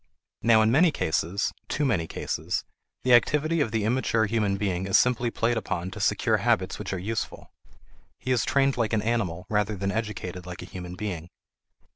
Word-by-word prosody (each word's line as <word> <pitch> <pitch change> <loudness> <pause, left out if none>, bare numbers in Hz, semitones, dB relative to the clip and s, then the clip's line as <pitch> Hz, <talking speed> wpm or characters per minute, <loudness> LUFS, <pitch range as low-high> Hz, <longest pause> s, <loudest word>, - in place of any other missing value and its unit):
Now 115 -1 +5
in 110 - +3
many 165 +7 +5
cases 90 - -1 0.2
too 150 - 0
many 95 -11 +1
cases - - -3 0.4
the 125 - +4
activity 150 +6 +3
of 135 - +1
the 110 -1 -1
immature 115 -1 +1
human 105 -2 0
being 95 -2 -1
is 95 - +5
simply 125 -1 +2
played 115 +1 0
upon 95 -4 -3
to - - -8
secure - - +2
habits - - +1
which - - -5
are 95 - -2
useful. 105 +4 -4 0.7
He 130 - -4
is 120 -4 +3
trained 135 -1 +2
like 115 -2 0
an 105 -2 +1
animal 100 -7 -1
rather 105 0 0
than 100 0 -2
educated 105 -5 -4
like 90 0 -7
a 90 - -13
human 90 -1 -6
being. 90 -5 -5
110 Hz, 185 wpm, -26 LUFS, 95-120 Hz, 0.7 s, Now